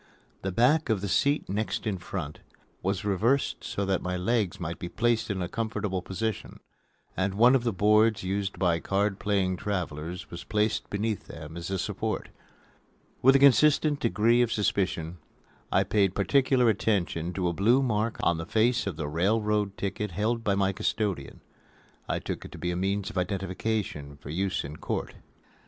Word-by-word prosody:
The 95 - -2
back 130 - +3
of 110 -4 +1
the 100 - -2
seat 140 +9 +1
next 105 +4 -2
in 100 -4 -1
front 80 -4 -5 0.4
was 95 +1 -1
reversed 115 +8 +1
so 100 - -2
that 95 -1 0
my 90 0 -2
legs 100 0 0
might 85 -1 -4
be 90 - -5
placed 115 +4 +1
in 95 -3 -1
a - - -2
comfortable 105 -3 -2
position, 105 +4 -4 0.6
and 95 +1 -1
one 120 +4 +6
of 130 -3 +3
the 120 - +1
boards 105 +1 +3
used 95 0 -2
by 85 -2 +2
card 100 +2 0
playing 95 -3 0
travelers 90 -3 -4
was 85 - -7
placed 105 +1 0
beneath 105 0 -2
them 80 0 -9
as 85 +1 -5
a 95 - -1
support. - - -3 0.9
With 135 +2 +6
a - - +9
consistent 145 +2 +5
degree 115 -1 +3
of 120 -2 +1
suspicion 90 -5 -1 0.5
I - - +4
paid 100 -3 +1
particular 130 +3 +3
attention 95 -6 0
to 90 -1 -1
a 85 - 0
blue 120 +9 +3
mark 110 -2 0
on 85 - +3
the 80 - -5
face 115 +1 +2
of 95 - -2
the 75 -2 -4
railroad 105 +5 0
ticket 100 +1 -3
held 115 +5 0
by 100 -2 +1
my 100 0 +1
custodian. 100 -7 -2 0.7
I - - +1
took - - -5
it - - -10
to - - -8
be 90 - -2
a - - -2
means 95 +2 -1
of 95 - -2
identification 95 -5 -3
for 70 0 -9
use 95 +3 -1
in 75 +2 -7
court. - - -3
100 Hz, 180 wpm, -28 LUFS, 90-110 Hz, 0.9 s, a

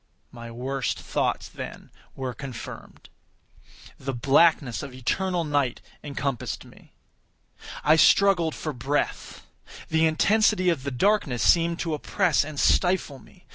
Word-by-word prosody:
My 115 -1 -9
worst 130 +2 -3
thoughts, - - -2
then, - - -9 0.2
were 130 -2 -4
confirmed. 125 -3 -9 0.9
The 135 -1 -4
blackness 140 0 +3
of 135 -3 -8
eternal 175 +8 -1
night 145 -5 0 0.2
encompassed 140 -3 -4
me. - - -19 0.9
I 155 +1 +5
struggled 170 -2 +4
for 155 - -4
breath. 135 +4 -3 0.4
The 160 0 +3
intensity 185 +3 +3
of 165 -6 0
the 140 - -3
darkness 140 - +1
seemed 170 0 +3
to 165 -2 -2
oppress 165 +1 +1
and 150 -1 -7
stifle 180 -7 +2
me. - - -21
145 Hz, 125 wpm, -25 LUFS, 130-170 Hz, 0.9 s, I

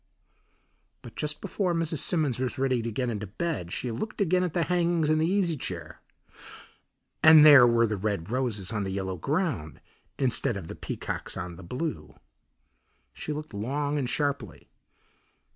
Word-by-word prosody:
But 120 - -11
just 150 -1 -3
before 180 -4 -1
Mrs. 165 -2 -1
Simmons 150 -9 0
was 130 +1 -2
ready 130 -2 +1
to 115 0 -4
get 125 +2 -1
into 105 -1 -4
bed 105 - -3
she 125 - -3
looked 215 - -5
again 185 -2 +2
at 180 -4 -2
the 170 - +2
hangings 170 -3 +1
and 155 0 +2
the 160 - +2
easy 185 -4 +1
chair, 85 - -7 1.2
and 155 -1 +9
there 140 -5 +9
were 115 0 +4
the 105 -2 -2
red 100 -2 -3
roses 120 -7 -2
on 105 -2 -1
the 95 - -3
yellow 95 -1 -3
ground 125 - -2 0.4
instead 120 -4 +1
of 85 -4 -8
the - - -6
peacocks - - -5
on 90 -2 -5
the 85 - -11
blue. 85 - -5 1.0
She - - -6
looked 150 -3 -6
long 145 +8 -2
and 130 -3 -2
sharply. 140 - -3
130 Hz, 165 wpm, -27 LUFS, 105-155 Hz, 1.2 s, and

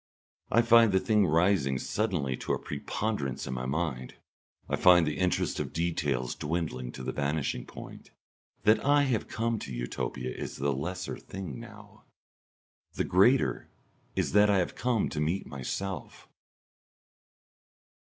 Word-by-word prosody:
I 115 +2 +5
find 115 -2 +6
the 95 - +4
thing 105 -2 +3
rising 80 -5 +2
suddenly 85 - -1
to - - -2
a - - +1
preponderance 100 - -3
in 65 - -4
my 65 0 -3
mind. 70 -4 -2 0.5
I - - 0
find 90 -2 +6
the 75 -1 -2
interest 90 -1 0
of - - -4
details 75 -7 -1
dwindling 75 -6 -3
to 65 - -7
the - - -2
vanishing 70 0 -2
point. - - -10 0.5
That 110 +1 +4
I 145 +1 +4
have 125 -6 0
come 115 0 -1
to 65 - -7
Utopia 60 +1 -4
is - - -5
the 70 0 0
lesser 90 +7 -4
thing 90 -10 -7
now; - - -13 0.9
the - - 0
greater 120 +9 +3 0.5
is - - 0
that 105 +1 +5
I 100 - +4
have 90 - 0
come 120 -4 0
to 75 - -3
meet 85 +6 -1
myself. 95 +8 -5
85 Hz, 145 wpm, -29 LUFS, 70-105 Hz, 0.9 s, find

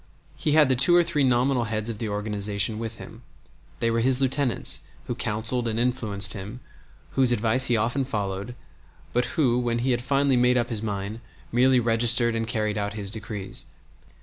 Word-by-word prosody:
He 150 - -1
had 155 -2 +6
the 130 - +2
two 135 +8 +5
or 175 - +6
three 155 -4 0
nominal 125 -1 +2
heads 110 0 -3
of 115 -3 -4
the 110 - -3
organization 105 0 -2
with 115 0 -5
him. - - -11 0.6
They 115 - +1
were 115 - +1
his 130 +2 +2
lieutenants, 135 -1 0 0.2
who - - -3
counseled 115 +1 -1
and 115 0 -1
influenced 110 -6 +1
him, 105 +5 -7 0.5
whose 130 +4 +2
advice 120 +3 +2
he 120 - +2
often 120 +5 0
followed, 100 -1 -4 0.6
but 125 0 +2
who, 125 -6 +3
when 120 -1 -1
he 125 +2 0
had 120 -1 0
finally 140 0 +2
made 125 +1 +3
up 120 -1 0
his 110 -4 -3
mind, 105 0 -4 0.3
merely 125 +2 +4
registered 115 0 +3
and 115 0 -2
carried 110 -2 -1
out 100 0 -3
his 100 -2 -5
decrees. 105 -3 -5
115 Hz, 185 wpm, -25 LUFS, 105-125 Hz, 0.6 s, had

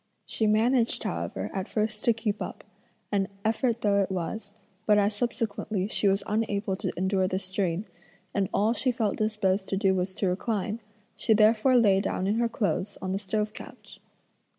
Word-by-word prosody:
She 220 - 0
managed 230 +3 +2
however - - -3
at 190 -1 -3
first 215 -1 -1
to 235 - +6
keep 220 -2 -3
up, - - -6 0.5
an 195 -2 +1 0.2
effort 230 +1 +1
though 200 -1 +3
it 195 - -1
was, 200 +3 -4 0.3
but 210 -1 +6
as 205 +1 +3
subsequently 215 -3 -2
she 210 - +2
was 195 0 +2
unable 205 -2 -1
to - - -2
endure 190 +1 +1
the 185 - -1
strain, 185 0 -1 0.5
and 195 -2 0
all 215 +3 +2
she 255 +1 +2
felt 225 -5 -1
disposed 210 -3 0
to 195 - 0
do 195 -1 +3
was 185 0 -2
to 195 - 0
recline, 210 +3 -1 0.4
she 220 - +3
therefore 220 +4 +4
lay 205 -5 +5
down 185 - -2
in 205 +3 +1
her 235 -1 +2
clothes 205 -2 -1
on 185 - -3
the 195 - -1
stove 210 +1 -2
couch. - - -11
210 Hz, 180 wpm, -27 LUFS, 195-220 Hz, 0.5 s, to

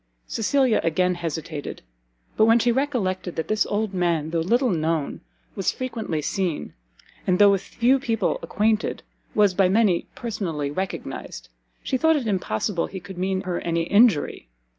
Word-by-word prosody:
Cecilia 255 +1 +2
again 180 +3 +2
hesitated; 160 -3 -5 0.5
but 220 - +5
when 225 +1 +6
she 240 +1 +2
recollected 230 -10 -1
that 160 - -3
this 215 -1 +2
old 210 -1 -1
man, 170 -4 0
though 165 - 0
little 240 +9 +2
known, 160 -3 -1 0.3
was 195 - 0
frequently 225 - -4
seen, 180 -1 -2 0.5
and 180 -1 +3
though 205 0 +7
with 195 -1 +1
few 250 +6 +2
people 230 -4 0
acquainted, 215 +1 0 0.3
was 205 -3 +4
by 185 0 +3
many 195 -4 +2
personally 180 - -3
recognized, 190 +6 -5 0.3
she 260 - 0
thought 320 +4 +4
it 280 -5 -1
impossible 180 - -1
he 190 - -7
could 180 0 -10
mean 190 0 0
her 185 -3 -3
any 170 0 0
injury. 200 - +3
190 Hz, 155 wpm, -24 LUFS, 170-225 Hz, 0.5 s, though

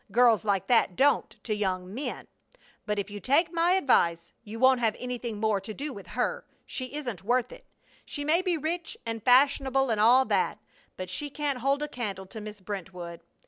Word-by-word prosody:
Girls 235 -3 +5
like 200 -3 0
that 225 -7 +3
don't 280 +3 +3
to 220 - -1
young 190 -2 -2
men. 270 +6 -4 0.6
But 210 0 0
if 200 0 -3
you 205 - -6
take 320 - +2
my 340 +2 +3
advice 170 - +2
you 220 0 -8
won't 260 0 +5
have 225 -2 +1
anything 245 -3 -4
more 215 -2 +1
to 215 +2 -7
do 290 0 -4
with 200 -3 -10
her! 365 - -2 0.2
She 255 +1 -6
isn't 245 - -5
worth 245 +4 +1
it! - - -13 0.4
She 290 -1 -5
may 325 +4 +3
be 365 -3 0
rich 325 +3 -3
and 225 -1 -4
fashionable 270 +1 +4
and 215 -2 +1
all 250 +4 +6
that, - - +1 0.4
but 185 0 -6
she 290 +9 -3
can't 285 -2 -2
hold 275 +3 +1
a - - -2
candle 210 -9 -5
to 215 +3 -9
Miss 210 -1 -9
Brentwood! 180 -3 -7
240 Hz, 195 wpm, -28 LUFS, 205-280 Hz, 0.6 s, all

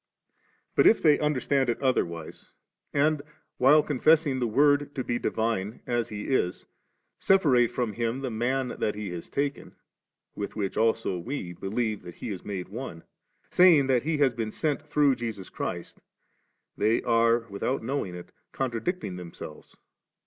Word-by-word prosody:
But - - +5
if 225 - +6
they 150 -2 +4
under 150 -3 +1
stand 135 -1 +1
it 115 - -1
otherwise, 85 - -2 0.4
and, 150 +1 +2 0.4
while 150 +4 +6
confessing 150 -1 +3
the 120 - 0
Word 145 +4 +3
to 130 - -2
be 120 0 -2
divine, 110 -2 -2
as 120 -2 -1
He 105 -1 -5
is, 95 -9 -1 0.5
separate 145 -11 +4
from 120 -3 -2
Him 115 +4 -2
the 130 -2 -3
Man 125 +3 -1
that 105 - 0
He 105 -3 -5
has 85 -1 -7
taken, 140 0 -3 0.6
with 100 - -5
which 100 -3 -2
also 110 -4 +1
we 90 -3 -5
believe 105 +4 -2
that 85 - -10
He - - -6
is 95 - -6
made 95 -3 -5
one, 105 -7 -7 0.5
saying 175 -6 +6
that 130 -2 +2
He 155 +3 -1
has 140 -4 +3
been 115 -2 -3
sent 150 +5 -1
through 150 -3 +2
Jesus 110 -6 -5
Christ, - - -5 0.7
they 110 +2 +1
are, 115 0 +3
without 115 +6 -2
knowing 115 -8 -3
it, 90 - -10 0.2
contradicting 125 - -3
themselves. 85 -3 -10
120 Hz, 155 wpm, -27 LUFS, 105-140 Hz, 0.7 s, if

